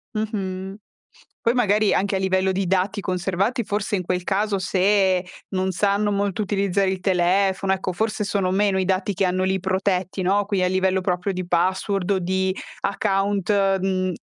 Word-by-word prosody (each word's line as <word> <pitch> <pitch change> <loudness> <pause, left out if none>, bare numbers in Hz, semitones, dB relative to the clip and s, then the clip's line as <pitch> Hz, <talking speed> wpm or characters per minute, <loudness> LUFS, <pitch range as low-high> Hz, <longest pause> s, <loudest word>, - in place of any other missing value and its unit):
Mh-mh. 195 -3 -3 0.7
Poi 230 - +2
magari 215 -3 +2
anche 200 0 +1
a - - 0
livello 190 0 +1
di 190 0 -1
dati 195 +2 0
conservati 190 +6 -1
forse 205 0 -2
in 185 - -2
quel 180 0 -2
caso 200 +1 0
se 190 0 +2 0.3
non 190 0 -1
sanno 200 +3 +1
molto 200 0 -1
utilizzare 200 -1 0
il 190 -1 -2
telefono, 190 +1 +2
ecco 190 -1 -3
forse 215 +2 -1
sono 195 -2 0
meno 195 0 +2
i 185 - 0
dati 190 +1 0
che 190 - +1
hanno 185 +1 0
lì 190 0 +1
protetti, 190 0 -1
no, 200 +2 +2
qui 200 -3 0
a - - +3
livello 190 0 +1
proprio 180 +1 -1
di 185 -1 -4
password 185 +2 0
o 195 - +2
di 190 +1 0 0.3
account, 195 0 0 0.3
uhm 185 -1 0
190 Hz, 170 wpm, -23 LUFS, 185-200 Hz, 0.7 s, a